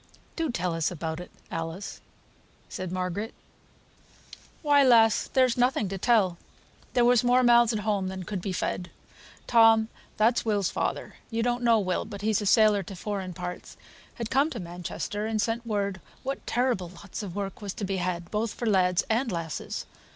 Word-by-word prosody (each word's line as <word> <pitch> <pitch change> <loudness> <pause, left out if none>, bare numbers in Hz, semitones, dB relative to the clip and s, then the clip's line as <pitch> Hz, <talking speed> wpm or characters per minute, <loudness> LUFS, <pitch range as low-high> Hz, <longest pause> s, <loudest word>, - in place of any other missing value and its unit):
"Do 325 -2 -1
tell 180 -7 -1
us 165 -2 0
about 160 -1 -4
it, 180 - -8 0.2
Alice," 165 +4 -5 0.7
said 185 -2 -5
Margaret. 185 +4 -3 1.3
"Why, 290 -1 +5
lass, 225 -4 +5
there's 255 -2 +3
nothing 245 -5 +2
to 195 0 -4
tell. 195 -6 +3 0.5
There 245 -1 +4
was 245 -1 +5
more 250 +1 +4
mouths 240 -1 +6
at 215 -2 -2
home 205 -3 0
than 190 0 -5
could 190 +1 -4
be 195 - -3
fed. 180 0 -2 0.6
Tom, 225 -1 +5 0.3
that's 225 +3 +3
Will's 205 -4 0
father - - -3
(you 230 0 -1
don't 245 0 0
know 230 -2 +4
Will, 185 -3 -1
but 200 -1 -8
he's 215 -1 +2
a 205 - -2
sailor 215 -1 +5
to 195 +1 -8
foreign 190 -1 -4
parts), 180 0 -7 0.4
had 230 -2 -5
come 275 +4 +3
to 245 - -6
Manchester, 180 +4 -4
and 220 -1 -1
sent 230 +2 -1
word 200 -4 -1 0.2
what 270 +1 -4
terrible 240 -8 0
lots 185 +4 -8
of 195 -4 -7
work 200 0 -4
was 200 -2 -5
to 205 - -3
be 195 0 -2
had, 175 -1 -3
both 215 0 -1
for 240 - -4
lads 185 -3 +3
and 230 +2 +1
lasses. 165 -3 -4
205 Hz, 180 wpm, -27 LUFS, 185-235 Hz, 1.3 s, mouths